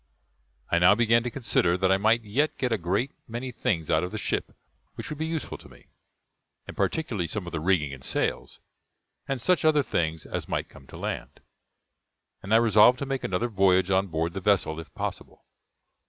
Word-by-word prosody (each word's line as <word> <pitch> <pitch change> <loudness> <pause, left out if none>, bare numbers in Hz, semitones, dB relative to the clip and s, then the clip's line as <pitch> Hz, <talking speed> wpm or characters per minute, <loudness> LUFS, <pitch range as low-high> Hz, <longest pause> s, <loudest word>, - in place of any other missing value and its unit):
I 85 - +3
now 90 +4 +6
began 115 0 +3
to 120 - -3
consider 100 -9 +1
that 95 0 +2
I 95 - +4
might 110 +3 +2
yet 130 +9 0
get 125 -2 -1
a 115 - +2
great 95 +10 -1 0.2
many 120 +3 -5
things 85 -9 -1
out 80 - +3
of 90 - -4
the 110 - -4
ship - - -2 0.4
which - - -7
would 150 - -6
be 160 - -1
useful 160 -1 -4
to - - -15
me, - - -19 0.8
and - - -8
particularly 115 - -1
some 95 +4 -4
of 85 - -7
the 80 - -3
rigging 80 -4 +1
and 65 -1 -11
sails, - - -2 0.7
and 135 -2 -2
such 180 +9 +2
other 155 -2 +4
things 80 -8 -2
as - - -5
might - - -2
come 70 - -16
to - - -11
land; - - -5 1.0
and 100 - -8
I 110 - +7
resolved 115 +2 +6
to 140 - -4
make 135 -1 -3
another 95 +6 -1
voyage 95 -3 +2
on 95 +1 +2
board 80 0 -2
the 95 - -5
vessel, 90 -5 +1
if 80 - -10
possible. - - -6
100 Hz, 200 wpm, -26 LUFS, 85-120 Hz, 1.0 s, I